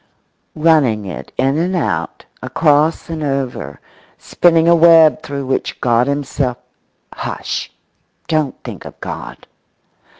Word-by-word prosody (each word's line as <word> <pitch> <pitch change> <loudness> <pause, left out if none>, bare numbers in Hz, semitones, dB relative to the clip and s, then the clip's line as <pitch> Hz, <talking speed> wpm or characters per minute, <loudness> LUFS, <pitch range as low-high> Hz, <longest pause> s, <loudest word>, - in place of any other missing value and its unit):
Running 150 -10 +2
it 95 - -8
in 135 +4 +1
and 180 +3 -1
out, 175 - -2 0.2
across 155 0 +1
and 165 -2 -5
over, 130 - -3 0.4
spinning 165 -1 +2
a 170 - +6
web 165 -2 +6
through 140 -1 -5
which 130 0 -2
God 120 +1 +2
himself—hush, 140 -3 -5 0.6
don't 155 -4 0
think - - -8
of - - -12
God! - - -8
145 Hz, 110 wpm, -17 LUFS, 130-160 Hz, 0.6 s, a